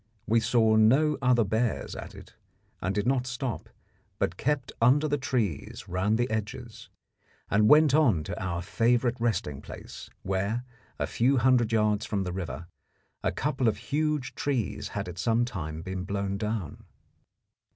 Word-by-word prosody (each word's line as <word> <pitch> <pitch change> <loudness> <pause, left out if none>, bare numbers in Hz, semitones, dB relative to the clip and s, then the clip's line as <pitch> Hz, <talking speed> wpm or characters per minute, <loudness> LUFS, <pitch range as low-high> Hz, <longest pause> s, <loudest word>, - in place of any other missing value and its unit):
We 115 +2 +3
saw 110 -1 +3
no 135 +8 +4
other 125 -3 +4
bears 110 +3 -1
at - - -8
it, - - -13 0.5
and 95 +2 -1
did 105 0 0
not 125 -1 +1
stop, 125 -1 -4 0.5
but 85 - -1
kept 135 +3 -1
under 140 +6 +5
the 145 -1 0
trees 120 - -2
round 95 +5 +1
the 120 +1 +1
edges, 110 +2 -5 0.6
and 105 +1 +4
went 150 -2 +6
on 120 - +4
to 85 - -5
our 85 -2 -2
favourite 120 +4 +1
resting 90 - -1
place, - - -10
where, 100 +5 -1 0.3
a - - 0
few 130 +4 +2
hundred 120 -2 +3
yards 105 -1 +1
from 100 -3 -1
the 90 -1 -4
river, 90 -2 -5 0.6
a - - +1
couple 125 - -1
of 105 -2 +2
huge 150 +4 -1
trees 130 -9 -2
had - - -4
at 90 0 -7
some 115 +4 +2
time 80 -8 -5
been 95 0 -4
blown 100 0 -2
down. 105 -7 -3
110 Hz, 160 wpm, -28 LUFS, 95-125 Hz, 0.6 s, went